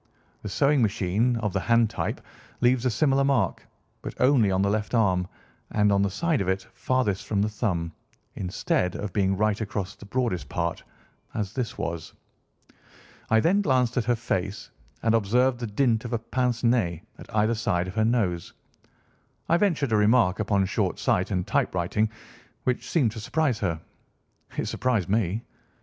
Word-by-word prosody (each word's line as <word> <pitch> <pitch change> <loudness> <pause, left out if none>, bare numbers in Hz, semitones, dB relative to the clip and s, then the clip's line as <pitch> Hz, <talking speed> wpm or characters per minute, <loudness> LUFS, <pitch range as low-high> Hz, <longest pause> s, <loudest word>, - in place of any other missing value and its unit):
The 105 - -5
sewing 140 +8 +3
machine, 105 +3 +1
of 105 -4 -2
the - - +1
hand 115 -2 +3
type, - - -3 0.4
leaves 125 0 +3
a - - +3
similar 135 +4 +2
mark, 135 -3 0 0.3
but - - -8
only 125 -5 +4
on 95 0 +1
the 100 - +2
left 110 +3 -1
arm, 95 -5 +2 0.4
and 105 -1 +2
on 100 0 +3
the 100 - +2
side 160 - 0
of 95 - -2
it 95 0 0
farthest 105 -7 -1
from 105 -2 0
the 105 - 0
thumb, 90 -7 -2 0.4
instead 90 -1 -1
of 105 -2 -5
being 95 -2 +1
right 105 +1 +1
across 100 -2 -3
the 105 - -14
broadest 105 - -1
part, 85 0 -2 0.5
as 105 -2 -2
this 125 -4 -3
was. 85 -5 -4 1.1
I 110 - +5
then 195 - +3
glanced 130 - +2
at 125 - 0
her 120 0 +2
face, 100 -3 -3 0.3
and, 115 -1 +3
observing 120 +4 +2
the 120 - -3
dint 110 +1 +1
of 120 -1 -5
a - - +2
pince 120 +1 -1
nez 110 -9 +1 0.2
at - - -10
either 110 +2 +3
side 100 -6 0
of 95 - -6
her 110 - +1
nose, 105 -7 0 1.0
I 170 - +5
ventured 165 - +1
a 110 - +4
remark 105 -2 +3
upon 100 -2 +2
short 95 - -1
sight 90 - +1
and 90 -3 -1
typewriting, 90 +5 0 0.5
which 125 -1 -1
seemed 135 -10 +2
to 110 - -7
surprise 135 +1 0
her." 85 -5 -1 0.8
"It - - 0
surprised 115 -8 0
me." 105 +1 0
110 Hz, 175 wpm, -26 LUFS, 95-125 Hz, 1.1 s, I